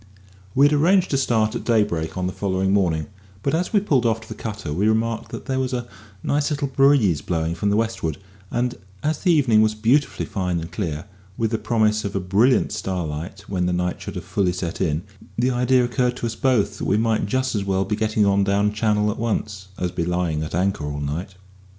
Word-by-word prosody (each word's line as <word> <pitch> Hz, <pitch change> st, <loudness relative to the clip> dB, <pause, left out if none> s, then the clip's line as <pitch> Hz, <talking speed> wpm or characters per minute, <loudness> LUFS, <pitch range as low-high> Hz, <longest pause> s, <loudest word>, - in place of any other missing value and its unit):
We 140 Hz, -, +6 dB
had 145 Hz, -, +4 dB
arranged 180 Hz, +5 st, +3 dB
to -, -, +2 dB
start 110 Hz, -5 st, +1 dB
at -, -, -4 dB
daybreak 105 Hz, -9 st, 0 dB
on 90 Hz, -, -1 dB
the 90 Hz, -, -2 dB
following 95 Hz, -1 st, 0 dB
morning; 85 Hz, -6 st, +1 dB, 0.4 s
but 140 Hz, -, 0 dB
as 175 Hz, +3 st, 0 dB
we 210 Hz, -, +4 dB
pulled 145 Hz, -, +2 dB
off 115 Hz, -1 st, +1 dB
to 115 Hz, -, -13 dB
the 110 Hz, -, -6 dB
cutter 105 Hz, -8 st, -5 dB
we 100 Hz, +7 st, +1 dB
remarked 110 Hz, +1 st, 0 dB
that -, -, -7 dB
there 130 Hz, -1 st, -1 dB
was 130 Hz, 0 st, -1 dB
a 120 Hz, -1 st, -3 dB, 0.4 s
nice 145 Hz, +1 st, +1 dB
little 145 Hz, -2 st, -1 dB
breeze 135 Hz, -, +4 dB
blowing 80 Hz, -1 st, -1 dB
from 95 Hz, +5 st, -1 dB
the 100 Hz, -, +2 dB
westward, 115 Hz, -8 st, -1 dB, 0.3 s
and 120 Hz, 0 st, 0 dB, 0.3 s
as 155 Hz, +1 st, 0 dB
the 180 Hz, -, +2 dB
evening 130 Hz, -9 st, +4 dB
was 110 Hz, 0 st, +2 dB
beautifully 120 Hz, +7 st, +1 dB
fine 90 Hz, -3 st, -2 dB
and 80 Hz, +1 st, -7 dB
clear, 85 Hz, -5 st, -3 dB, 0.3 s
with 115 Hz, -1 st, 0 dB
the 110 Hz, -, 0 dB
promise 110 Hz, -2 st, +1 dB
of 100 Hz, 0 st, -4 dB
a -, -, +1 dB
brilliant 100 Hz, +8 st, +3 dB
starlight 90 Hz, 0 st, -4 dB
when 90 Hz, -2 st, -1 dB
the 90 Hz, -, 0 dB
night 90 Hz, 0 st, -1 dB
should -, -, -7 dB
have -, -, -5 dB
fully 95 Hz, -3 st, 0 dB
set 90 Hz, -2 st, -4 dB
in, 75 Hz, +1 st, 0 dB, 0.3 s
the 125 Hz, +2 st, +2 dB
idea 125 Hz, 0 st, +3 dB
occurred 125 Hz, 0 st, 0 dB
to -, -, -4 dB
us 115 Hz, -, -2 dB
both 110 Hz, -6 st, +1 dB
that -, -, -3 dB
we 100 Hz, -, +2 dB
might 110 Hz, -2 st, +1 dB
just 130 Hz, +4 st, 0 dB
as 105 Hz, -3 st, -1 dB
well 95 Hz, 0 st, 0 dB
be 105 Hz, +2 st, -1 dB
getting 110 Hz, -1 st, +1 dB
on 100 Hz, 0 st, +3 dB
down 100 Hz, +1 st, +1 dB
Channel 105 Hz, -1 st, +1 dB
at -, -, -7 dB
once, 105 Hz, -4 st, -2 dB
as 90 Hz, -1 st, -2 dB
be 85 Hz, -, -2 dB
lying 85 Hz, -3 st, -1 dB
at 80 Hz, 0 st, -4 dB
anchor 95 Hz, -2 st, 0 dB
all 75 Hz, 0 st, -4 dB
night. 80 Hz, +7 st, -4 dB
105 Hz, 225 wpm, -22 LUFS, 90-120 Hz, 0.4 s, We